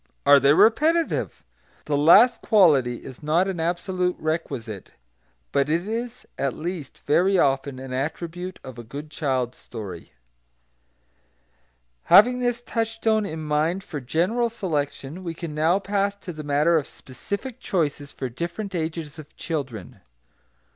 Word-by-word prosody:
Are 145 0 +8
they 140 +1 +4
repetitive? 310 - +2 0.4
The 150 - 0
last 200 - +6
quality 140 - +3
is 130 -2 -10
not 160 +5 +2
an 190 -3 -3
absolute 180 +2 -1
requisite; 120 - -4 0.6
but 140 +1 +1
it 170 +5 0
is 235 +2 -4
at 135 -2 -1
least 165 -3 -6
very 185 +6 +3
often 135 -3 +1
an 130 0 -7
attribute 170 +6 -4
of 130 -2 -9
a - - -7
good 145 +6 -8
child 130 -5 -1
story. 100 -7 -9 1.9
Having 235 +8 +7
this 245 -1 -1
touchstone 225 -2 0
in 160 0 -6
mind 155 +5 0
for 145 - -6
general 180 - 0
selection, 160 -5 -3
we 170 -2 -5
can 165 -2 -6
now 160 +4 +2
pass 200 0 -1
to 190 -3 -8
the 155 - -7
matter 150 +3 +3
of 150 - -2
specific 200 - -7
choices 145 -8 -2
for 130 - -5
different 170 - -5
ages 160 -2 -4
of 150 -1 -13
children. 130 - -5
160 Hz, 140 wpm, -24 LUFS, 140-195 Hz, 1.9 s, Are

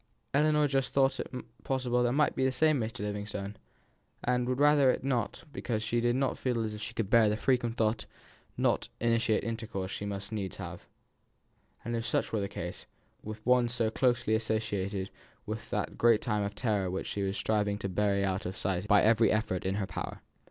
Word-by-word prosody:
Ellinor 150 +1 +4
just 135 -2 -1
thought 135 -1 +3
it - - -4 0.3
possible 125 -2 +1
it - - +1
might 150 +1 +2
be - - 0
the 130 - +3
same 155 +2 +3
Mr. 110 -2 -3
Livingstone, 105 0 -4 0.7
and 125 0 +1
would 130 +1 0
rather 145 -2 +6
it 125 - +1
were - - -3
not, 120 -3 -1
because 110 -3 -2
she 120 +2 0
did 120 +1 +2
not 135 0 0
feel 120 -3 0
as 110 -1 -3
if 105 - -7
she 115 +2 -6
could 105 -3 -2
bear 115 -3 +6
the 105 - 0
frequent 120 -2 +1
though 110 -1 +3 0.6
not - - +1
intimate 115 -2 +2
intercourse 110 -5 -4
she 100 - -4
must 100 +1 -5
needs 100 -4 -3
have, - - -8 1.0
if 115 0 -1
such 120 - 0
were 110 - +1
the 100 - -2
case, 90 +1 -6 0.3
with 110 0 -8
one 125 -1 +4
so 115 -2 0
closely 120 -2 +2
associated 105 -3 -1 0.3
with - - -5
that - - -3
great 115 -2 +5
time 105 -3 0
of 100 0 -3
terror 105 -5 0
which 95 +1 -3
she 100 - -3
was 95 0 -1
striving 105 -2 +1
to 100 - -3
bury 100 +1 +1
out 95 0 -1
of 95 - -6
sight 95 +1 -1
by 105 -1 +5
every 110 +1 +5
effort 105 -4 0
in 95 - 0
her 100 -1 -1
power. - - -6
110 Hz, 200 wpm, -30 LUFS, 100-125 Hz, 1.0 s, rather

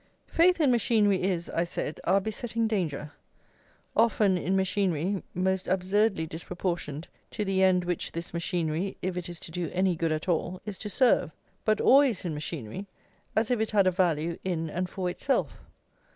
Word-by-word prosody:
Faith 355 +2 +3
in 290 -5 +4
machinery 215 -4 +3
is, 180 -2 -1
I 170 - +1
said, 170 -3 -4
our 195 - +4
besetting 225 +2 -2
danger; 160 -9 -2 0.8
often 215 -4 +3
in 180 +2 0
machinery 190 -1 0
most 190 +1 0
absurdly 190 0 +1
disproportioned 170 -2 -4 0.2
to 210 - -3
the 190 -1 +1
end 185 -1 +4
which 175 -1 -2
this 170 0 -6
machinery, 170 +1 -1
if 185 0 -1
it 180 -1 -4
is 175 -1 -7
to - - -9
do 170 -2 -3
any 185 -1 +1
good 165 0 0
at 155 +2 -2
all, 175 +1 0
is 210 -3 -6
to 210 - -5
serve; 245 - +3 0.4
but 215 -1 +3
always 265 -8 +4
in 170 - -2
machinery, 150 - -5 0.5
as 220 +2 +1
if 245 - +2
it 220 - 0
had 200 -3 +3
a 185 - +4
value 170 -3 0
in 165 -4 -2
and 180 0 -2
for 185 0 -3
itself. 265 +9 -1
185 Hz, 175 wpm, -28 LUFS, 170-205 Hz, 0.8 s, in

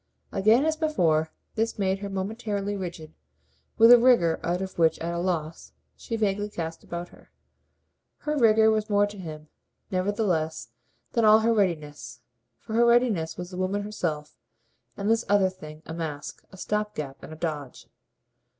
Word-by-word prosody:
Again, 220 +8 +4
as 315 0 +1
before, 165 - +1 0.2
this 225 0 -1
made 190 -1 0
her 200 0 -5
momentarily 205 +1 -3
rigid, 170 -5 -7 0.6
with 230 +1 +8
a 245 - +10
rigour 235 -10 +4
out 175 +1 0
of 190 -2 -6
which, 165 -1 +4
at 170 +1 -4
a 170 - -2
loss, 170 -3 -3 0.2
she 230 - -5
vaguely 205 -1 0
cast 165 -4 -6
about 175 +1 -6
her. - - -19 0.9
Her 300 0 -2
rigour 220 -4 +5
was 215 0 -1
more 205 0 +4
to 205 -1 -9
him, 155 -3 -8 0.4
nevertheless, 185 - -1 0.4
than 230 - +1
all 215 0 +7
her 230 +1 +3
readiness; 150 - -2 0.4
for 220 - -9
her 235 +1 +4
readiness 235 -9 +2
was 180 +1 -7
the 180 - -7
woman 190 +2 -1
herself, 160 -8 -4 0.6
and 200 - -3
this 225 +1 +2
other 200 -2 +4
thing 155 -4 -12
a 160 - -7
mask, 155 -3 -6
a 190 - -13
stop 210 +2 -2
gap 135 -2 -6
and - - -10
a - - -7
"dodge." 150 -5 -5
190 Hz, 170 wpm, -26 LUFS, 160-215 Hz, 0.9 s, a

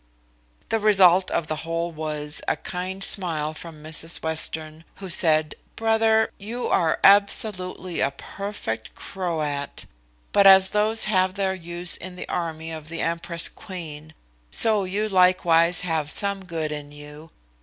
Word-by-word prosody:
The 225 - +1
result 190 -3 +5
of 165 - -1
the 155 0 -4
whole 165 +2 -3
was 150 -1 -5
a - - +1
kind 185 +2 -5
smile 160 -6 -1
from 155 -1 -10
Mrs 160 +1 -2
Western, 160 0 -1
who 190 -2 -6
said, 155 -2 +3 0.2
"Brother, 225 0 +2
you 230 +5 -4
are 165 -2 +1
absolutely 195 -3 +2
a 135 - +2
perfect 140 - -6
Croat; 155 -7 -4 0.5
but 200 -1 +5
as 190 0 +7
those 215 +2 +2
have 185 -3 +1
their 195 -1 0
use 175 -1 -1
in 185 0 -8
the - - -7
army 165 -2 -4
of 155 -1 -8
the 165 - -4
empress 170 0 -1
queen, 160 -5 -9 0.3
so 215 - +3
you 205 +4 -1
likewise 180 -3 +3
have 160 -4 -2
some 200 +1 +1
good 160 -3 -4
in 145 -1 -6
you. 150 +2 -12
170 Hz, 145 wpm, -23 LUFS, 155-195 Hz, 0.5 s, as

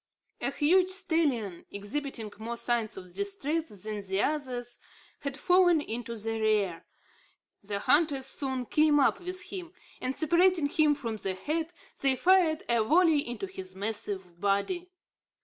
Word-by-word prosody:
A - - 0
huge 360 +5 +3
stallion, 315 - -1
exhibiting 220 +2 -4
more 235 +2 -4
signs 235 -2 -1
of 180 -2 -10
distress 330 -5 -2
than 215 -1 -4
the 190 0 -2
others, 250 -4 -2 0.4
had 280 -2 -4
fallen 355 0 +4
into 235 -3 -4
the 225 +1 -3
rear. 205 -6 +1 0.7
The 200 0 -3
hunters 285 +4 +2
soon 265 -2 -3
came 300 +2 +4
up 270 - +3
with 365 0 -3
him; 360 -3 -6 0.3
and, 255 +1 -1
separating 340 -1 +3
him 300 -1 +3
from 230 -6 -4
the 190 -2 -3
herd, 315 - -2 0.3
they 270 -1 +4
fired 345 0 +4
a 235 -2 +3
volley 320 +5 +4
into 240 -5 -4
his 190 0 -8
massive 195 -3 -3
body. 205 - 0
265 Hz, 145 wpm, -29 LUFS, 215-325 Hz, 0.7 s, fallen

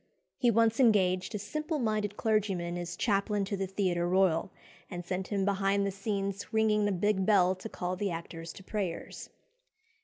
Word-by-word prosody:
He 250 -2 +4
once 230 +1 +3
engaged 190 -5 +3
a - - 0
simple 305 - -3
minded 215 -5 -1
clergyman 195 -6 0
as 175 -1 -4
"chaplain 205 -1 +1
to 200 - -2
the 195 -1 -2
Theatre 180 -3 0
Royal," 185 -2 +2 0.4
and 175 -2 -6
sent 185 +1 -3
him 200 -2 0
behind 200 0 +1
the 200 - -1
scenes 195 0 -3
ringing 215 -2 +3
a - - +1
big 195 +1 +1
bell 185 -2 +4
to 190 +4 -8
call 180 -2 -3
the 200 +2 -1
actors 165 -1 -6
to 190 - -12
prayers. 190 -4 -4
195 Hz, 175 wpm, -30 LUFS, 185-210 Hz, 0.4 s, He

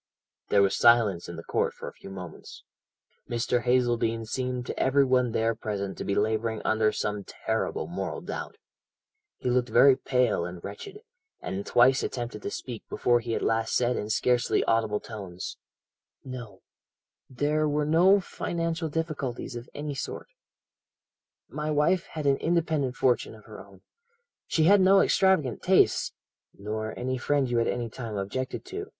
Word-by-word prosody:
"There 100 -1 +5
was 95 - +2
silence 115 -7 +4
in 85 - -6
the 85 - -8
court - - 0
for - - -8
a - - -7
few - - -12
moments. 90 -3 -10 0.7
Mr. 120 +1 0
Hazeldene 120 -2 +1
seemed 125 +2 -3
to - - -5
every 140 +1 +4
one 125 -2 +2
there 115 +1 +1
present 100 -3 -4
to - - -3
be 100 - -1
labouring 110 +1 0
under 110 -1 +2
some 105 -1 -3
terrible 110 +3 -3
moral 175 - -4
doubt. - - -6 0.8
He 125 - -1
looked 125 -1 +1
very 135 +4 +6
pale 125 -9 +1
and 90 0 -7
wretched, 390 - -8 0.4
and 100 +1 -5
twice 130 +2 +5
attempted 120 -3 -4
to - - -4
speak 120 +1 -6
before 120 -1 +2
he 115 -1 -3
at - - -2
last 115 0 0
said 125 0 +2
in 105 - -4
scarcely 120 +2 +2
audible 110 -2 +1
tones: 95 -5 -7 0.7
"'No; 125 -4 -8 0.7
there 150 +3 0
were 150 0 0
no 175 +6 +5
financial 165 -2 -3
difficulties 145 -6 -3
of 120 +1 -8
any 145 0 -4
sort. 135 - -6 1.2
My 150 0 -4
wife 150 +4 +2
had 155 -2 -6
an 140 -1 +4
independent 160 -6 0
fortune 125 -3 +1
of 110 - -17
her 110 - -10
own 95 -1 -18 0.7
she 160 - +2
had 200 +4 +6
no 195 +1 +6
extravagant 185 - +2
tastes - - +3 0.2
' - - -65
"'Nor 110 +2 -4
any 130 +1 -2
friend 140 +1 +1
you 120 -1 +1
at 115 - +1
any 120 -1 -1
time 115 -1 -6
objected 130 - -4
to?' 400 +2 -6
120 Hz, 165 wpm, -27 LUFS, 110-145 Hz, 1.2 s, very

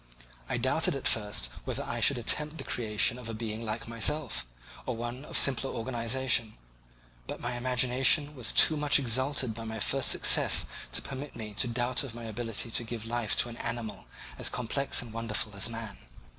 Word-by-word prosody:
I - - -1
doubted 140 +7 +1
at 135 - 0
first 105 - +2
whether - - -4
I - - -5
should 140 - +5
attempt 150 +6 0
the - - -5
creation 115 +1 0
of 120 -2 -8
a 115 - -5
being 110 0 -5
like 110 +1 -5
myself, 115 - 0 0.4
or 125 - -2
one 120 +3 -6
of - - +1
simpler 135 0 +4
organization; 115 -1 -1 0.7
but - - -6
my 120 +1 -3
imagination 130 +4 +2
was 125 -5 +2
too 160 - +6
much 150 -1 +3
exalted 130 -1 +1
by 115 +1 -8
my 110 0 -6
first 135 +5 +2
success - - +5 0.3
to - - -1
permit 140 +1 -8
me 105 -1 -8
to 115 - 0
doubt 120 +3 +1
of 125 -4 -7
my 120 - -9
ability 115 0 -4
to 120 - -1
give 115 -1 -7
life 120 -1 -1
to 120 - -5
an 115 - -10
animal 115 -4 -5 0.3
as - - -1
complex 125 +2 0
and 115 -2 -11
wonderful 110 -2 -3
as 100 +3 +2
man. 115 -3 -7
120 Hz, 185 wpm, -29 LUFS, 115-130 Hz, 0.7 s, too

